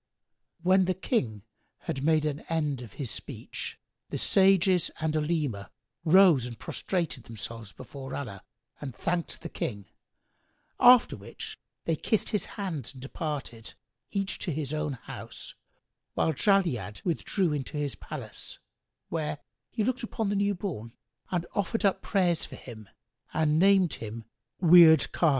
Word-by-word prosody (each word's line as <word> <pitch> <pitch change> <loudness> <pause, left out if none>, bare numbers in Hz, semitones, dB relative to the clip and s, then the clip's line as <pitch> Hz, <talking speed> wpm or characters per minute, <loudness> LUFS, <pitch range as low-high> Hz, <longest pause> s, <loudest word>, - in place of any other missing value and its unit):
When 185 +1 +5
the 185 0 0
King 125 - -1 0.4
had 135 - -3
made 155 0 +3
an 150 -1 -1
end 150 -5 0
of 115 -5 -10
his 130 -7 -5
speech, - - -6 0.3
the - - -3
sages 190 -2 +4
and 155 0 0
Olema 150 - -1 0.4
rose 165 -7 +6
and 120 -2 -8
prostrated 170 - -3
themselves 115 -1 -7
before 135 -1 -8
Allah 100 -9 -5 0.4
and 135 -4 -6
thanked 170 -1 -2
the - - -3
King; 100 -4 -4 0.9
after 245 -1 +7
which 100 -1 -8 0.3
they 165 - +2
kissed 220 +7 0
his 210 - 0
hands 160 - -3
and 130 - -12
departed, 135 -6 -5 0.3
each 195 -1 -2
to 175 - -2
his 150 -1 -3
own 150 -2 -1
house, 125 - -8 0.6
whilst 160 -3 +1
Jali'ad 170 - +2
withdrew 175 0 0
into 145 +1 -3
his 145 -2 -1
palace, - - -8 0.5
where, 155 -2 -2 0.3
he 220 - -1
looked 255 +3 0
upon 225 -3 -2
the 205 - 0
new 200 0 +2
born 145 - -5 0.4
and 175 -2 -1
offered 205 +2 0
up 195 - +2
prayers 180 -5 +1
for - - -6
him 110 -5 -11 0.5
and 155 0 +3
named 190 -3 +5
him 115 0 -6 0.3
Wird 165 -3 +8
Khбn. 165 - +3
155 Hz, 145 wpm, -29 LUFS, 130-185 Hz, 0.9 s, Wird